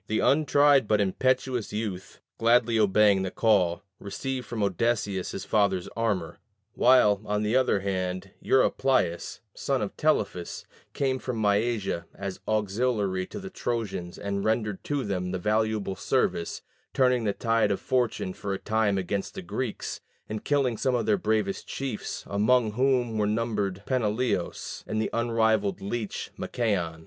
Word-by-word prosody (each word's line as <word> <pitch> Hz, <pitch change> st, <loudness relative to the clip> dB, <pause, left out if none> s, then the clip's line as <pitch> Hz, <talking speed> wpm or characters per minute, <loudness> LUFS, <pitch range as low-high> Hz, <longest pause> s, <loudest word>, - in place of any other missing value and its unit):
The 110 Hz, -, 0 dB
untried 145 Hz, -3 st, +4 dB
but 105 Hz, 0 st, +3 dB
impetuous 125 Hz, +4 st, 0 dB
youth, 100 Hz, -3 st, -5 dB, 0.2 s
gladly 115 Hz, 0 st, +4 dB
obeying 105 Hz, -1 st, +4 dB
the 95 Hz, -, -1 dB
call, 95 Hz, -6 st, +2 dB, 0.2 s
received 130 Hz, +5 st, -4 dB
from 115 Hz, -3 st, -2 dB
Odysseus 100 Hz, -1 st, 0 dB
his 95 Hz, -, -5 dB
father's 100 Hz, -4 st, +1 dB
armor; 105 Hz, -8 st, -2 dB, 0.3 s
while, 120 Hz, -6 st, +5 dB
on 105 Hz, 0 st, -1 dB
the 105 Hz, +3 st, +1 dB
other 130 Hz, -6 st, +3 dB
hand, 95 Hz, -1 st, -3 dB
Eurypylus, 130 Hz, -10 st, +1 dB
son 135 Hz, -1 st, -1 dB
of 105 Hz, -2 st, -4 dB
Telephus, 100 Hz, -, 0 dB, 0.3 s
came 130 Hz, -2 st, 0 dB
from 125 Hz, -3 st, -4 dB
Mysia 105 Hz, -3 st, 0 dB
as 100 Hz, -1 st, -5 dB
auxiliary 105 Hz, -3 st, 0 dB
to -, -, -7 dB
the 190 Hz, -1 st, -8 dB
Trojans 110 Hz, -, -3 dB
and 100 Hz, 0 st, -3 dB
rendered 110 Hz, -3 st, -1 dB
to 145 Hz, -2 st, -1 dB
them 90 Hz, -4 st, -2 dB
valuable 105 Hz, -1 st, 0 dB
service 85 Hz, -2 st, -1 dB, 0.3 s
turning 125 Hz, -2 st, +3 dB
the 105 Hz, -, +2 dB
tide 115 Hz, -1 st, +1 dB
of 100 Hz, -, 0 dB
fortune 120 Hz, -7 st, 0 dB
for 100 Hz, +1 st, -4 dB
a -, -, -3 dB
time 110 Hz, -2 st, +1 dB
against 95 Hz, +1 st, -3 dB
the 190 Hz, -, -6 dB
Greeks, 130 Hz, -9 st, -4 dB, 0.3 s
and 110 Hz, -1 st, -5 dB
killing 135 Hz, -5 st, +1 dB
some 130 Hz, -2 st, +1 dB
of 115 Hz, -3 st, 0 dB
their 105 Hz, -, +3 dB
bravest 110 Hz, -, -1 dB
chiefs, 135 Hz, -6 st, -4 dB
among 110 Hz, +3 st, +2 dB
whom 125 Hz, -2 st, +1 dB
were 105 Hz, -, +2 dB
numbered 105 Hz, -3 st, -1 dB
Peneleos, 110 Hz, -5 st, -1 dB
and 110 Hz, -, -1 dB
the 110 Hz, -, -1 dB
unrivalled 110 Hz, -3 st, +1 dB
leech 105 Hz, +2 st, -4 dB
Machaon. 90 Hz, -9 st, -1 dB
110 Hz, 145 wpm, -27 LUFS, 100-120 Hz, 0.3 s, while